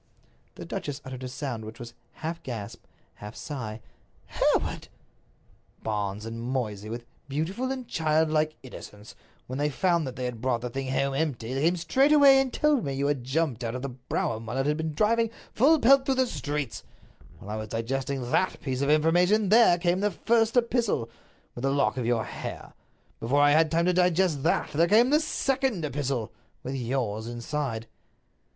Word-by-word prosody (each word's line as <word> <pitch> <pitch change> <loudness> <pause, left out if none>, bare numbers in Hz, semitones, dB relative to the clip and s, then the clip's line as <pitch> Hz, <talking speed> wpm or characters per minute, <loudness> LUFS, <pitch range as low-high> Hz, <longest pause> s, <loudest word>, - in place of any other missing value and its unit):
The - - -8
duchess 145 -1 -4
uttered 130 -1 -7
a - - -3
sound 125 -3 -5
which 110 +1 -9
was 120 -1 -9 0.2
half 165 +1 -5
gasp, 110 -6 -7 0.3
half 105 +1 -9
sigh. 115 -7 -6 0.4
"Hereward!" - - 0 1.0
"Barnes 105 -1 -2
and 115 +1 -6
Moysey, 110 -5 -3
with 120 +1 -6 0.2
beautiful 185 - -2
and 260 -3 -5
childlike 155 -1 +1
innocence, 105 -4 -11 0.3
when 130 +2 -5
they 145 +1 +1
found 170 +1 +1
that 130 - -6
they 130 - -4
had 120 -3 -5
brought 125 -2 0
the 125 0 -4
thing 135 +1 -4
home 135 +1 0
empty, 135 -6 -2
came 155 +7 +2
straightway 270 - +5
and 270 -1 0
told 300 -3 +2
me 140 - -2
that - - -4
you 140 - 0
had 145 -3 0
jumped 130 -2 -1
out 115 +1 -3
of 125 - -5
the 140 - -2
brougham 120 -3 -3
while 110 - -3
it 135 - +1
had 150 +1 +2
been 160 -1 -3
driving 230 +5 +2 0.2
full 300 +7 +5
pelt 270 +2 +5
through 270 - +2
the 260 0 +3
streets. 145 - -4 0.6
While 105 - -9
I 110 - -3
was 110 - -5
digesting 130 +3 -3
that 185 - +1
piece 130 -2 -3
of 140 - +1
information 175 +7 +3
there 220 -5 +6
came 175 +1 +1
the 205 +1 +2
first 225 +5 +1
epistle, 235 - +1 0.4
with 120 - -8
the 135 - +1
lock 140 -1 +1
of 120 -3 -1
your 120 -2 +1
hair. - - -7 0.5
Before 130 +5 +1
I 145 0 +6
had 160 +1 +4
time 165 +2 +1
to 180 - +3
digest 180 -4 +2
that - - +1
there 165 +3 +3
came 230 +7 +5
the 300 - +5
second 265 - 0
epistle, 135 -6 -2 0.3
with 130 - -4
yours 120 -4 -2
inside." 120 0 -3
145 Hz, 185 wpm, -27 LUFS, 120-180 Hz, 1.0 s, there